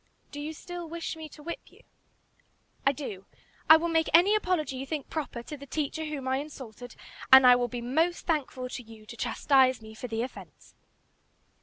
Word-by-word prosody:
"Do 290 - -7
you 300 +2 -4
still 350 +1 -8
wish 335 0 -4
me 315 -1 -8
to 300 - -14
whip 340 +2 -5
you?" - - -20 1.1
"I - - +7
do. 230 -9 -7 0.4
I 315 - +11
will 335 +2 -1
make 325 -1 +1
any 365 +5 +6
apology 360 -9 0
you 265 - -4
think 300 -2 -5
proper 280 -6 -4
to 300 - -7
the 280 0 -11
teacher 310 +2 -2
whom 290 -4 -5
I 260 0 +1
insulted, 255 -4 -8 0.4
and 265 0 +10
I 250 0 +9
will 245 0 0
be 240 0 -5
most 320 +9 0
thankful 275 -6 -1
to 250 - -6
you 220 -2 -14
to 235 - -10
chastise 260 +1 +3
me 220 -1 -12
for 235 +3 -7
the 225 0 -2
offence." 255 - -10
280 Hz, 195 wpm, -28 LUFS, 250-320 Hz, 1.1 s, I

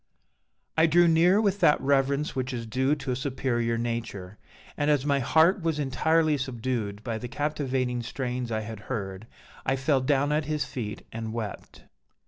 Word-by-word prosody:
"I 160 0 +5
drew 175 +2 +5
near 170 +4 +5
with 200 -2 +1
that 150 - +5
reverence 140 +1 +1
which 130 0 -2
is 115 -2 -4
due 130 +6 +1
to 140 -3 -4
a - - 0
superior 125 -4 -1
nature; 115 -5 -4 0.4
and 145 0 0
as 145 -2 +2
my 140 -1 +2
heart 160 - +4
was 165 -2 0
entirely 155 +2 +2
subdued 115 -5 -3
by 115 -2 -3
the 125 - -5
captivating 130 -2 -1
strains 125 0 -4
I 110 0 -1
had 110 0 -7
heard, 100 -3 -4 0.4
I 135 - +1
fell 135 0 +1
down 140 +2 +2
at 150 0 +1
his 150 -2 -1
feet 105 -5 -6
and 110 -1 -5
wept. 110 -3 -6
130 Hz, 170 wpm, -27 LUFS, 115-150 Hz, 0.4 s, I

